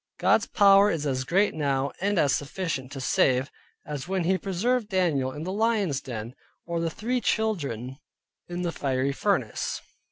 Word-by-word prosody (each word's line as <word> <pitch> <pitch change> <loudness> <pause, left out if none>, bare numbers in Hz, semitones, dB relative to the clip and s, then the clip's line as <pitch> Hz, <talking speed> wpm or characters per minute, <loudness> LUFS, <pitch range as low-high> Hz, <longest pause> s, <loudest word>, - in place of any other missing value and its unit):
God's - - +3
power 200 0 +6
is 160 -6 -1
as 130 -2 0
great 195 +9 +2
now, 140 -2 0
and 200 +1 +1
as 145 -4 +3
sufficient 145 -3 -3
to 135 - -6
save, 130 0 +2 0.3
as 145 -1 -5
when 190 -1 0
He 185 +3 +2
preserved 205 +6 -1
Daniel 165 - +1
in 150 +3 -7
the 185 - -3
lion's 210 - +1
den; 115 -1 -6 0.3
or 170 0 -2
the 165 0 0
three 240 +9 -2
children 140 - -1 0.5
in 175 +1 -4
the 170 - -1
fiery 135 -2 -1
furnace. 140 - -1
165 Hz, 165 wpm, -26 LUFS, 135-195 Hz, 0.5 s, power